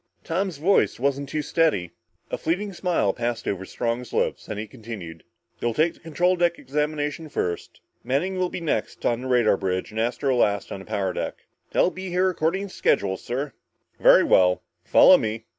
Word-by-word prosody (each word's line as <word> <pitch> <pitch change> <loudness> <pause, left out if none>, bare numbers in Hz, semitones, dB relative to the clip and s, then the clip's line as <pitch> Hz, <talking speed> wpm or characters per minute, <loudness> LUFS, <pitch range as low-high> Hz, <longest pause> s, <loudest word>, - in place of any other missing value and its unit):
Tom's 180 0 -2
voice 175 -1 +2
wasn't 140 +1 -1
too 150 0 -2
steady. 150 - +1 0.4
A - - -1
fleeting 195 +5 -1
smile 175 - +1
passed 120 -1 -3
over 95 -1 -2
Strong's 120 +3 -3
lips, - - -1
then - - -5
he 105 - -3
continued. 100 -7 -9 0.4
"You'll 120 -1 -1
take 165 +2 +2
the - - -22
control 175 +3 +1
deck 175 -1 +1
examination 150 +2 -2
first. 85 -10 -3 0.2
Manning 180 +9 -1
will 180 -1 +1
be 175 - -5
next 165 - -2
on 120 0 +1
the 130 - -5
radar 120 -5 +3
bridge 95 +1 -2
and 110 - -4
Astro 125 +3 0
last 100 -4 +1
on - - -5
the 95 - -11
power 95 -2 -1
deck." - - -5 0.3
"They'll 185 - +3
be 190 0 -6
here 185 +1 +2
according 185 +4 -1
to - - -14
schedule, 95 -1 +1
sir." 135 +8 -4 0.5
"Very - - +7
well. 90 -1 +4 0.2
Follow - - +7
me." 110 +1 -3
135 Hz, 185 wpm, -24 LUFS, 110-170 Hz, 0.5 s, Very